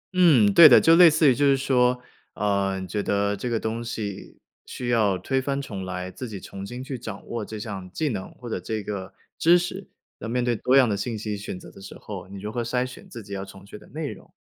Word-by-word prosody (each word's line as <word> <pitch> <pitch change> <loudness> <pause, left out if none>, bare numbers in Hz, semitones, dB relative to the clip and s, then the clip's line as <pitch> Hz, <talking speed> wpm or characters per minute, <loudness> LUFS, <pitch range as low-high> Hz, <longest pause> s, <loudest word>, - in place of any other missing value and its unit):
嗯， 140 - +5
对 165 -2 +10
的。 125 - +8
就 165 - +5
类 175 0 +9
似 155 0 +3
于 - - +3
就 145 - 0
是 140 -1 +4
说， 125 -2 +2 0.4
呃， 100 -2 0
你 95 - -6
觉 105 +3 -2
得 100 0 0
这 125 - -4
个 115 - 0
东 115 +2 -3
西 105 -4 -6 0.3
需 120 -1 -5
要 105 -5 +2
推 130 +9 -1
翻 140 +1 -2
重 105 -9 -6
来， 90 0 -5
自 130 - -7
己 100 -3 -7
重 95 +1 -9
新 120 +6 -7
去 130 -2 -6
掌 110 -4 -8
握 115 -2 -4
这 110 +1 -7
项 100 -4 -6
技 155 - -1
能 100 -7 -5
或 125 - -11
者 110 - -3
这 110 +4 -4
个 100 -2 -5 0.3
知 170 +2 +6
识。 180 +2 -5 0.3
那 - - -6
面 120 +1 -1
对 120 -1 +1
多 125 +4 +1
样 130 -2 +6
的 105 - 0
信 110 +2 -3
息 105 -1 -4
选 100 -2 -6
择 - - -13
的 95 - -15
时 95 - -10
候， 100 -4 -8
你 100 +1 -9
如 105 +2 -5
何 120 - -2
筛 125 +2 -1
选 125 - -11
自 115 - -9
己 100 0 -9
要 95 -1 -4
重 95 0 -13
学 105 +1 -11
的 - - -17
内 155 -1 -5
容。 - - -14
110 Hz, 280 characters per minute, -24 LUFS, 100-130 Hz, 0.4 s, 对